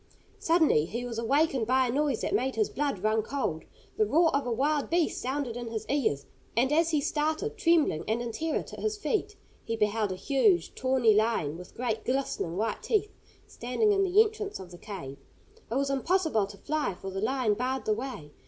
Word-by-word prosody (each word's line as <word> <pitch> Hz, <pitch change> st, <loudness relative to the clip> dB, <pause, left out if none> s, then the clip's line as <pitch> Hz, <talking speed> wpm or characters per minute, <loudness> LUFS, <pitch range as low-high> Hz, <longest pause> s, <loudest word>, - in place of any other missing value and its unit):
Suddenly 320 Hz, -, +3 dB
he 235 Hz, +8 st, -4 dB
was 230 Hz, -2 st, -4 dB
awakened 270 Hz, 0 st, +1 dB
by 260 Hz, +1 st, +3 dB
a 240 Hz, -, -1 dB
noise 280 Hz, -2 st, 0 dB
that -, -, -2 dB
made 260 Hz, 0 st, 0 dB
his 215 Hz, -2 st, +1 dB
blood 280 Hz, -10 st, -2 dB
run 215 Hz, +1 st, +2 dB
cold. 215 Hz, -, -3 dB, 0.3 s
The 435 Hz, -, +4 dB
roar 325 Hz, -1 st, +3 dB
of 280 Hz, -2 st, 0 dB
a -, -, -1 dB
wild 285 Hz, +5 st, 0 dB
beast 340 Hz, -1 st, +1 dB
sounded 260 Hz, -2 st, -2 dB
in 240 Hz, -1 st, -5 dB
his 225 Hz, -1 st, -4 dB
ears, 220 Hz, -, 0 dB, 0.3 s
and 260 Hz, +4 st, +3 dB
as 330 Hz, +1 st, +3 dB
he 310 Hz, -3 st, +2 dB
started 310 Hz, +9 st, -1 dB
trembling 330 Hz, -, +2 dB
and 220 Hz, +2 st, 0 dB
in 240 Hz, -1 st, -3 dB
terror 320 Hz, +7 st, -2 dB
to -, -, -10 dB
his 430 Hz, -1 st, -1 dB
feet, 420 Hz, 0 st, -1 dB, 0.3 s
he 225 Hz, -, -2 dB
beheld 210 Hz, -1 st, 0 dB
a -, -, -2 dB
huge, 290 Hz, -, +2 dB
tawny 255 Hz, -4 st, +3 dB
lion, 210 Hz, -9 st, +1 dB
with 180 Hz, +1 st, -11 dB
great 225 Hz, -3 st, -2 dB
glistening 255 Hz, -10 st, -2 dB
white 220 Hz, +2 st, -1 dB
teeth, 425 Hz, -1 st, 0 dB, 0.3 s
standing 335 Hz, -, 0 dB
in 395 Hz, -1 st, +3 dB
the 380 Hz, +2 st, +3 dB
entrance 425 Hz, -2 st, -5 dB
of 185 Hz, -2 st, -10 dB
the 175 Hz, -, -11 dB
cave. 140 Hz, -10 st, -8 dB, 0.5 s
It 230 Hz, -, -2 dB
was 275 Hz, +1 st, +1 dB
impossible 290 Hz, -, +1 dB
to 200 Hz, 0 st, -11 dB
fly, 295 Hz, -2 st, -2 dB
for 190 Hz, +1 st, -7 dB
the 195 Hz, +1 st, -4 dB
lion 245 Hz, -1 st, +1 dB
barred 255 Hz, +4 st, -2 dB
the 215 Hz, -, +2 dB
way. 220 Hz, -, -6 dB
260 Hz, 205 wpm, -28 LUFS, 220-310 Hz, 0.5 s, The